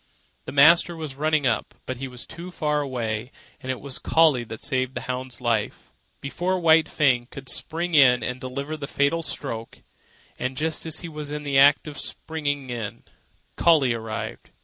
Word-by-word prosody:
The - - -6
master 165 +5 +6
was 155 -4 -6
running 155 +1 +1
up, 125 - 0
but 130 -1 -5
was 125 -2 -7
too 175 +2 -9
far 150 -4 0
away; 120 -3 -3 0.3
and 130 - -3
it 130 - -4
was 140 -2 -5
Collie 155 -7 +4
that 110 -1 -8
saved 130 -2 -1
the - - -3
hound's 125 0 -5
life. 115 -3 -1 0.3
Before 180 +7 -1
White 160 -1 +5
Fang 125 -5 +2
could 135 -1 -10
spring 170 +5 -1
in 125 -5 +6
and 125 +2 -4
deliver 140 +4 -4
the 145 -2 -6
fatal 145 +5 +1
stroke, 115 -7 -5 0.6
and 130 +1 -3
just 160 +2 -1
as 160 0 -4
he 170 - -6
was 150 -2 -5
in 150 0 -4
the 140 -2 +2
act 145 +2 +6
of 145 -2 -6
springing 145 -4 -3
in, 115 -4 -5 0.5
Collie 150 -8 +4
arrived. 110 - -5
140 Hz, 175 wpm, -24 LUFS, 125-155 Hz, 0.6 s, master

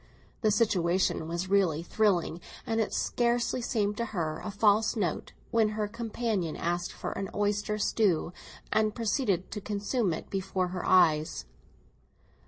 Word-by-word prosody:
The 215 - +3
situation 185 -6 +1
was 170 +3 -3
really 185 -5 +2
thrilling, 175 -3 +1 0.2
and 225 -2 0
it 215 - -1
scarcely 240 +1 0
seemed 210 -3 0
to 235 - -1
her 155 -2 -2
a - - -4
false 210 +2 +3
note 185 -8 -2 0.2
when 225 -2 +3
her 210 -1 0
companion 220 -5 -2
asked 175 +1 -2
for - - -5
an 195 - -4
oyster 205 +1 0
stew, 195 -5 +1 0.4
and 215 -1 +2
proceeded 210 -5 0
to 210 - -4
consume 205 +1 -1
it 160 - -5
before 190 -1 -1
her 180 0 -4
eyes. 160 -4 +3
205 Hz, 145 wpm, -29 LUFS, 180-220 Hz, 0.4 s, The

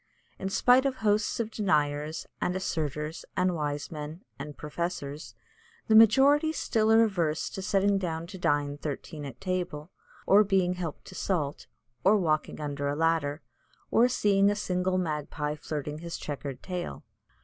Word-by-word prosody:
In 190 - -2
spite 250 +6 +4
of 265 - -2
hosts 215 -2 +1
of 225 -1 -2
deniers, 150 -6 0 0.2
and 180 - 0
asserters, 155 -3 -3
and 185 0 +2
wise 145 -2 -3
men, 155 +4 -7 0.2
and 145 +1 -7
professors, 150 -2 -5 0.5
the 220 - +3
majority 270 +8 +6
still 220 -7 +1
are 225 0 +7
averse 170 -8 0
to 190 - -5
sitting 200 0 +2
down 165 -3 -3
to 190 +2 -10
dine 145 -3 0
thirteen 150 0 -5
at 135 -4 -9
table, 180 -4 -3 0.3
or 205 +2 +6
being 190 -3 +2
helped 175 -4 -6
to - - -11
salt, 160 -7 -2 0.4
or 205 +3 +5
walking 155 -6 0
under 145 -1 -3
a 145 - -1
ladder, 160 -2 0 0.5
or 235 +2 +5
seeing 200 -5 +3
a 205 - +1
single 185 -2 0
magpie 150 -3 -2
flirting 150 0 -5
his 170 0 -5
chequered 140 -2 -6
tail. 180 -2 -5
170 Hz, 155 wpm, -28 LUFS, 150-200 Hz, 0.5 s, are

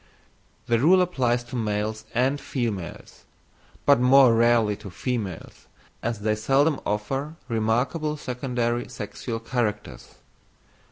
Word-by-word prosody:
The 115 -1 +2
rule 175 +9 +5
applies 130 -10 +1
to 120 +2 -9
males 110 -1 -2
and 135 +4 +1
females; 110 - -5 0.6
but 140 -2 +5
more 125 -1 +6
rarely 115 -2 +3
to 100 - -10
females, 100 -2 -5 0.3
as 115 -2 -3
they 105 +1 +1
seldom 135 +7 +2
offer 135 +9 -2
remarkable 125 +8 0
secondary 125 -3 -2
sexual 115 -2 -5
characters. 115 -3 -3
120 Hz, 110 wpm, -25 LUFS, 110-135 Hz, 0.6 s, more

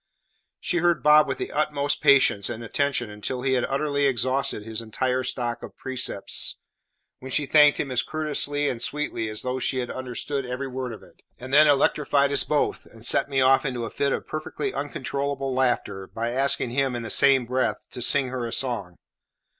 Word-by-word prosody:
She 175 - -2
heard 175 -1 +1
Bob 150 0 +6
with 135 - -3
the - - -5
utmost 145 -1 -1
patience 135 -8 +4
and 120 0 -6
attention 125 -1 -1
until 125 +5 -5
he 135 -1 +1
had 125 -2 +1
utterly 145 0 0
exhausted 130 -3 -1
his 110 0 -5
entire 125 +3 -1
stock 120 -2 -3
of - - -11
precepts, 130 -6 -2 0.6
when 130 - -9
she 145 +2 +1
thanked 150 0 +5
him 135 - -2
as 125 - +2
courteously 145 -2 -1
and 120 -4 -3
sweetly 145 -7 -2
as 110 0 -1
though 130 +1 -2
she 130 - 0
had 125 -1 -3
understood 130 +2 -4
every 125 +2 -4
word 130 -1 -5
of 110 - -10
it; - - -20 0.2
and 130 +2 -9
then 150 +2 +7
electrified 140 0 +2
us 140 - +4
both, 150 -1 -1
and 115 0 -10
set - - +4
me 135 -1 +1
off 130 +1 +4
into 125 -4 -3
a - - -7
fit 140 -1 -1
of - - -2
perfectly 155 -1 -4
uncontrollable 140 -1 -3
laughter, 115 -7 -1
by 115 +1 -4
asking 130 -1 +1
him, 135 0 0
in 120 - -4
the 110 - -3
same 135 -3 +5
breath, 130 +2 -2
to 125 - -7
sing 130 +2 +3
her 125 -2 -4
a - - -7
song. 115 -10 -2
130 Hz, 195 wpm, -24 LUFS, 120-140 Hz, 0.6 s, then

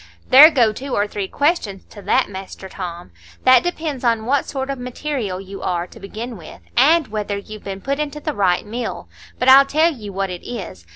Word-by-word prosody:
"There 285 +4 +11
go 240 -8 +2
two 265 +4 -5
or 205 - +2
three 205 -2 -4
questions 285 - -1
to 205 - -11
that, - - +2
Master 190 -1 -9
Tom. 175 - -7 0.3
That 255 -1 +7
depends 315 -6 -4
on 230 -2 +1
what 275 +3 +1
sort 270 -1 -3
of 275 - -5
material 245 -6 -4
you 195 0 -9
are, 175 -1 -1
to - - -15
begin 220 +4 -7
with, 165 - -12 0.2
and 305 +4 +4
whether 210 -1 -3
you've 215 +1 -10
been 195 -1 -6
put 275 +5 -2
into 300 0 -3
the 305 0 -3
right 190 -5 +1
mill. 235 +3 -5 0.3
But 250 - -1
I'll 270 +1 +9
tell 320 +4 +2
you 210 -7 -9
what 195 0 -2
it 180 - -6
is. 185 - -8
230 Hz, 210 wpm, -20 LUFS, 195-275 Hz, 0.3 s, There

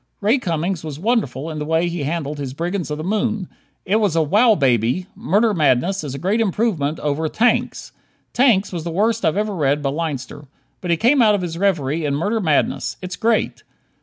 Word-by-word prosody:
Ray 220 +6 +2
Cummings 170 -3 -2
was 150 -3 -6
wonderful 165 - -1
in 155 - -5
the - - -2
way 160 +2 +1
he 170 -2 -3
handled 150 0 -3
his 135 -2 -5
"Brigands 175 +2 -3
of 150 - -3
the 155 - -5
Moon." 215 0 -1 0.4
It 200 +4 +2
was 205 -7 +1
a 165 - +3
"wow 215 +9 +4
baby." 125 - +1
"Murder 210 +4 +1
Madness" 160 +3 +1
is 140 -3 -5
a - - -4
great 195 +9 0
improvement 185 -8 0
over 150 +2 -1
"Tanks." 240 +8 0 0.4
"Tanks" 225 -7 +3
was 170 -3 -4
the 170 - -4
worst 220 +6 0
I've 160 +4 +1
ever 210 0 -1
read 145 -4 0
by 135 - 0
Leinster. 145 -2 -5 0.3
But 180 - -5
he 170 - +3
came 250 - +3
out 215 -2 +5
of 190 - -3
his 165 -2 -4
reverie 165 -5 0
in 145 -2 0
"Murder 205 +9 -1
Madness." 155 -6 0
It's 185 0 -6
great. 225 +3 0
170 Hz, 205 wpm, -20 LUFS, 150-210 Hz, 0.4 s, out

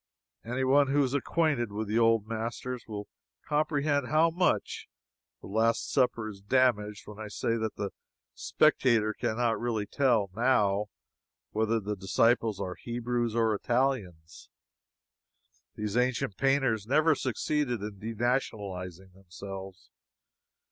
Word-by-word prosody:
Any 125 +3 -2
one 140 +2 +4
who 140 +1 +3
is 130 -1 -1
acquainted 145 -5 0
with 105 +1 -3
the 110 +3 +1
old 115 -2 +3
masters 115 +2 -4
will 105 -2 -6 0.4
comprehend 150 -2 +1
how 160 +3 +3
much 180 +2 0 0.5
"The - - -10
Last 110 +4 +1
Supper" 125 -4 +1
is 100 -2 -9
damaged 105 -2 +1
when 105 0 -11
I 110 - -5
say 115 +2 -1
that 110 -1 -3
the 100 -1 -4 0.4
spectator 120 -8 +2
can 110 - -2
not 120 -2 +1
really 115 -3 -1
tell, 115 -5 +1
now, 105 -5 +2 0.6
whether 110 +1 +1
the 105 0 -4
disciples 110 +2 +1
are 90 - -3
Hebrews 120 -1 -2
or 115 -2 +2
Italians. 105 -9 -2 1.3
These 105 0 -3
ancient 125 -5 0
painters 135 -6 +1
never 155 +5 +4
succeeded 130 -3 -1
in 105 -2 -6
denationalizing 100 -6 -3
themselves. 95 -3 -10
115 Hz, 125 wpm, -29 LUFS, 105-130 Hz, 1.3 s, one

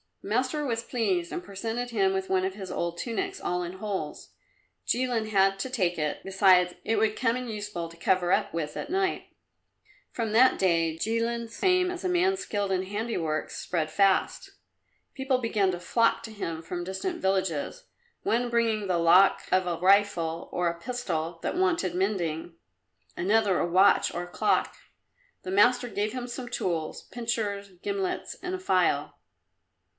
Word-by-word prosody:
The - - -8
master 255 +7 0
was 230 -3 -1
pleased 190 -9 -1
and 175 - -4
presented 225 +5 -4
him 195 -5 +2
with 190 0 -2
one 185 -1 +2
of 190 - -2
his 190 -2 -7
old 170 0 -2
tunics, 385 - -3
all 180 0 -1
in 175 +1 -5
holes. 190 -6 -5 0.6
Jilin 245 -3 0
had 195 -1 +3
to 260 - -3
take 185 -9 0
it, 150 -1 -2
besides, 190 -2 +4
it 225 - 0
would 215 -1 +2
come 235 -2 +1
in 250 -1 -5
useful 210 -6 -4
to 170 - -15
cover 180 +1 +1
up 205 +1 +2
with 155 -3 -3
at 290 - -5
night. 380 0 -1 0.8
From 225 -3 -2
that 250 +4 +5
day 165 -3 +1
Jilin's 230 +3 -2
fame 365 -1 +3
as 360 -1 -6
a 370 - 0
man 360 +2 +3
skilled 205 - -2
in 185 -1 +1
handiworks 195 -7 -3
spread 155 -3 -2
fast. 195 +2 +2 0.6
People 265 -1 0
began 215 -5 +1
to 175 - -4
flock 230 +6 +2
to 225 - -7
him 165 -6 -4
from 175 +1 -4
distant 190 - -4
villages, 190 - -1 0.4
one 240 +2 +1
bringing 225 -3 +1
the 180 -2 +1
lock 175 +4 +5
of 185 0 +3
a 170 -1 -1
rifle 180 -4 +2
or 175 0 0
a 170 0 -2
pistol 170 -8 -3
that - - -2
wanted 345 - +1
mending; 175 -4 -1 0.6
another 200 +1 +2
a - - +1
watch 190 +3 +4
or 175 - -3
a - - -8
clock. - - +1 0.7
The 185 - -5
master 245 +5 +4
gave 210 0 -2
him 250 -1 -4
some 245 0 -6
tools 165 -7 -2
pincers, 220 -4 -2
gimlets 200 -2 -2
and 365 0 -3
a - - -6
file. 375 - +1
200 Hz, 170 wpm, -27 LUFS, 180-235 Hz, 0.8 s, that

